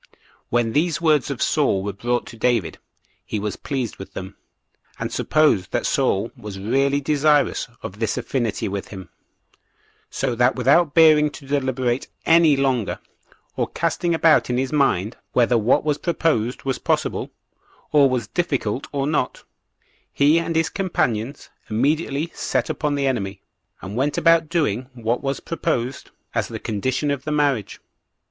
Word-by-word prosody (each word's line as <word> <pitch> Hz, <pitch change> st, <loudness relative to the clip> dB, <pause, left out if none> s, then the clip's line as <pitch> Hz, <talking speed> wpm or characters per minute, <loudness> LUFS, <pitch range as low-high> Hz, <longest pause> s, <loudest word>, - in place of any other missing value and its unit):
3. -, -, -31 dB, 0.3 s
When 120 Hz, -1 st, +1 dB
these 160 Hz, +1 st, +1 dB
words 155 Hz, -5 st, +2 dB
of -, -, -2 dB
Saul 95 Hz, -1 st, +1 dB
were 100 Hz, 0 st, -3 dB
brought 120 Hz, +5 st, -1 dB
to -, -, -11 dB
David, 115 Hz, -7 st, 0 dB, 0.4 s
he 105 Hz, -, -3 dB
was 105 Hz, -1 st, -3 dB
pleased 130 Hz, -6 st, -4 dB
with 95 Hz, -, -10 dB
them, 95 Hz, +1 st, -7 dB, 0.6 s
and -, -, -4 dB
supposed 150 Hz, -12 st, +2 dB
that -, -, 0 dB
Saul 100 Hz, +4 st, +1 dB
was 105 Hz, -2 st, -8 dB
really 135 Hz, +8 st, +1 dB
desirous 150 Hz, 0 st, +2 dB, 0.2 s
of 100 Hz, +3 st, -7 dB
this 115 Hz, 0 st, -1 dB
affinity 120 Hz, -3 st, -2 dB
with 100 Hz, 0 st, -4 dB
him; 95 Hz, -3 st, -10 dB, 1.0 s
so 135 Hz, -2 st, -2 dB
that 120 Hz, +1 st, +2 dB
without 140 Hz, +5 st, +3 dB
bearing 155 Hz, -2 st, +6 dB
to 145 Hz, -1 st, -12 dB
deliberate 130 Hz, -3 st, -1 dB, 0.2 s
any 165 Hz, -3 st, +5 dB
longer, 130 Hz, -5 st, 0 dB, 0.6 s
or -, -, 0 dB
casting 170 Hz, -1 st, -1 dB
about 160 Hz, -4 st, +4 dB
in 125 Hz, -, 0 dB
his 130 Hz, +2 st, -1 dB
mind 120 Hz, -8 st, +1 dB, 0.2 s
whether 125 Hz, 0 st, +3 dB
what 115 Hz, +6 st, +3 dB
was 150 Hz, -1 st, 0 dB
proposed 150 Hz, -9 st, 0 dB
was 135 Hz, -1 st, -2 dB
possible, -, -, -1 dB, 0.6 s
or 145 Hz, -2 st, +5 dB
was 125 Hz, -3 st, -1 dB
difficult 135 Hz, -, -2 dB
or 140 Hz, -1 st, -1 dB
not, 145 Hz, -3 st, -1 dB, 0.7 s
he 150 Hz, +4 st, +4 dB
and 165 Hz, 0 st, -3 dB
his 165 Hz, +1 st, +2 dB
companions 140 Hz, -, -2 dB, 0.2 s
immediately 145 Hz, +6 st, 0 dB
set 130 Hz, -2 st, -1 dB
upon 150 Hz, -1 st, -1 dB
the 140 Hz, -1 st, 0 dB
enemy, 100 Hz, -7 st, -2 dB, 0.4 s
and 95 Hz, +2 st, -6 dB
went 140 Hz, +4 st, 0 dB
about 165 Hz, -1 st, +4 dB
doing 130 Hz, -, 0 dB
what 120 Hz, 0 st, -1 dB
was 135 Hz, -1 st, -2 dB
proposed 135 Hz, -6 st, -3 dB, 0.2 s
as -, -, 0 dB
the -, -, -6 dB
condition 130 Hz, +7 st, -1 dB
of 140 Hz, -2 st, -3 dB
the 150 Hz, -, -3 dB
marriage. 140 Hz, -8 st, 0 dB
130 Hz, 155 wpm, -22 LUFS, 115-150 Hz, 1.0 s, bearing